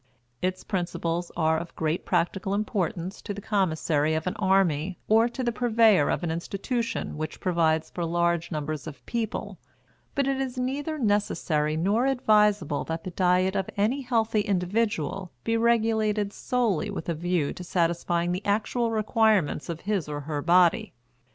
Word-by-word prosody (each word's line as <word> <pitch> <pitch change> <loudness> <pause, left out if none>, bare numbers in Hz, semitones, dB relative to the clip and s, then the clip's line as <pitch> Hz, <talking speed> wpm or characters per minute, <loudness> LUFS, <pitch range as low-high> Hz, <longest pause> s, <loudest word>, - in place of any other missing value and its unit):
Its 185 0 -2
principles 175 -2 -2
are 160 -1 +2
of 170 +1 -9
great 160 +2 -1
practical 185 +2 0
importance 190 -3 -2
to 205 - -5
the - - -6
commissary 160 -7 +1
of 160 - -2
an 185 - -1
army 185 -3 +2
or 225 +2 +4
to 255 +2 -5
the 240 - +1
purveyor 225 -7 +4
of - - -1
an 165 - -1
institution 200 - -3
which 155 0 -5
provides 165 -3 +1
for 175 - -3
large 170 0 0
numbers 155 -1 -4
of 150 - -10
people; 230 -2 -3 0.6
but 280 - +2
it 270 0 0
is 260 -1 -4
neither 280 +5 -2
necessary 180 - 0
nor 205 +10 +2
advisable 210 - +2
that 165 0 -4
the 185 - -5
diet 185 +2 +2
of 195 -1 -1
any 225 +8 +1
healthy 225 -4 +1
individual 200 0 -1
be 225 - 0
regulated 220 -3 +1
solely 235 -10 0
with - - -5
a 170 - 0
view 170 -2 -1
to 180 - -8
satisfying 170 0 0
the 180 +3 -3
actual 220 +3 0
requirements 215 -7 +1
of 165 -1 -4
his 200 -7 -1
or 145 0 -4
her 145 0 -3
body. 175 +1 +3
190 Hz, 160 wpm, -26 LUFS, 165-220 Hz, 0.6 s, or